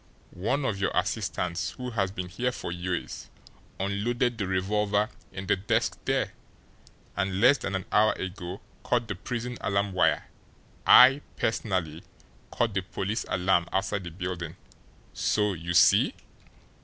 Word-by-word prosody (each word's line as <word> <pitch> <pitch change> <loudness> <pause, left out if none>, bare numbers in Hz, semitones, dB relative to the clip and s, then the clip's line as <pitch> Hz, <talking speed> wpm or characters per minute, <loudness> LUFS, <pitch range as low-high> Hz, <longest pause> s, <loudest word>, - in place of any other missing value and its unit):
One 135 +6 +1
of 100 -6 -1
your 95 - +1
assistants 85 -1 -1
who 125 -1 -6
has 100 -4 0
been 95 -1 -5
here 120 +7 -1
for 105 - -6
years 90 +1 -4 0.5
unloaded 120 +6 0
the 100 - -1
revolver 105 +3 +1 0.2
in 95 0 -6
the - - +3
desk 95 +1 0
there, - - 0 0.8
and 95 -1 -1
less 130 +6 +6
than 95 - -3
an 95 - -3
hour 110 +1 +4
ago 95 0 -6 0.2
cut 120 -2 +1
the 105 - -2
prison 120 +5 -5
alarm 100 0 0
wire. 90 - +2 0.6
I, 135 +3 +9 0.2
personally, 90 -8 -1 0.5
cut 115 -3 0
the 95 - 0
police 95 +4 -3
alarm 90 -1 +2
outside 95 0 -1
the 85 - -6
building. 85 -1 -5 0.6
So 105 -2 +1
you 85 0 -4
see!" 90 - +5
100 Hz, 145 wpm, -27 LUFS, 90-110 Hz, 0.8 s, I